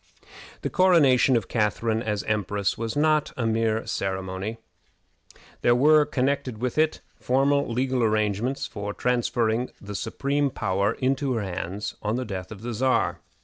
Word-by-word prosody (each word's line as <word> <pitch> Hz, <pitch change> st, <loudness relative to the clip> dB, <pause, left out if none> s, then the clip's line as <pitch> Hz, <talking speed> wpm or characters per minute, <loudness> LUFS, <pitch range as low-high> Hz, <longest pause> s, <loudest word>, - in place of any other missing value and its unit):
The -, -, -2 dB
coronation 145 Hz, -9 st, +5 dB
of 110 Hz, -, -3 dB
Catharine 110 Hz, 0 st, 0 dB
as 105 Hz, -3 st, -2 dB
empress 105 Hz, -1 st, -1 dB
was 115 Hz, -1 st, -4 dB
not 155 Hz, 0 st, +2 dB
a 120 Hz, -, -1 dB
mere 110 Hz, -1 st, +1 dB
empty -, -, -6 dB
ceremony. 95 Hz, +3 st, -3 dB, 1.0 s
There 120 Hz, -, +4 dB
were 150 Hz, +3 st, +5 dB
connected 130 Hz, -3 st, -1 dB
with 125 Hz, +5 st, -2 dB
it 155 Hz, 0 st, +1 dB, 0.2 s
formal 140 Hz, +1 st, +2 dB
legal 130 Hz, +1 st, 0 dB
arrangements 110 Hz, +5 st, 0 dB
for 105 Hz, 0 st, -5 dB
transferring 120 Hz, -1 st, 0 dB
the 105 Hz, 0 st, -8 dB
supreme 140 Hz, +7 st, -1 dB
power 100 Hz, -2 st, 0 dB
into 135 Hz, +1 st, 0 dB
her 115 Hz, -3 st, -1 dB
hands 95 Hz, +2 st, -4 dB
on 105 Hz, +1 st, -1 dB
the 130 Hz, +1 st, -2 dB
death 95 Hz, -3 st, -6 dB
of 110 Hz, -1 st, -9 dB
the 120 Hz, 0 st, -3 dB
Czar. 130 Hz, +4 st, +1 dB
115 Hz, 150 wpm, -25 LUFS, 105-130 Hz, 1.0 s, coronation